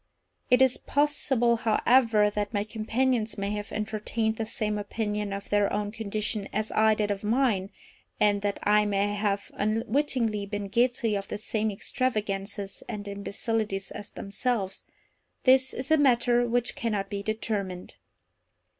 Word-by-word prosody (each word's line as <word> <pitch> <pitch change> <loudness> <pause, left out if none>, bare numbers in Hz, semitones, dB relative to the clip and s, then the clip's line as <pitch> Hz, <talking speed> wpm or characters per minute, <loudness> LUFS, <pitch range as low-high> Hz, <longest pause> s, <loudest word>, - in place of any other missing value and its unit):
It 250 0 +6
is 260 -1 +3
possible, 270 -5 +1
however, 225 -1 +3
that 205 +1 -2
my 205 - +1
companions 225 +1 0
may 200 0 -2
have 210 0 -4
entertained 220 +1 -2
the 225 - -2
same 210 -1 -2
opinion 210 0 -2
of 200 0 -5
their 205 -1 +2
own 205 0 -1
condition 210 -1 -3
as 215 +1 -2
I 220 0 +4
did 210 -1 0
of 200 0 -3
mine, 215 -4 +1 0.5
and 205 -1 +3
that 205 0 -1
I 210 0 +4
may 205 0 +1
have 205 -1 -1
unwittingly 225 0 0
been 205 -1 -4
guilty 235 0 +2
of 200 0 -3
the - - -4
same 215 +1 -1
extravagances 200 -3 -2
and 205 -1 -5
imbecilities 200 0 -2
as 205 - -7
themselves—this 245 +4 -1
is 260 +3 -5
a 315 - +6
matter 245 -3 +3
which 240 +1 0
cannot 215 -7 -2
be 200 -1 -2
determined. 200 -4 -3
215 Hz, 145 wpm, -27 LUFS, 205-235 Hz, 0.5 s, It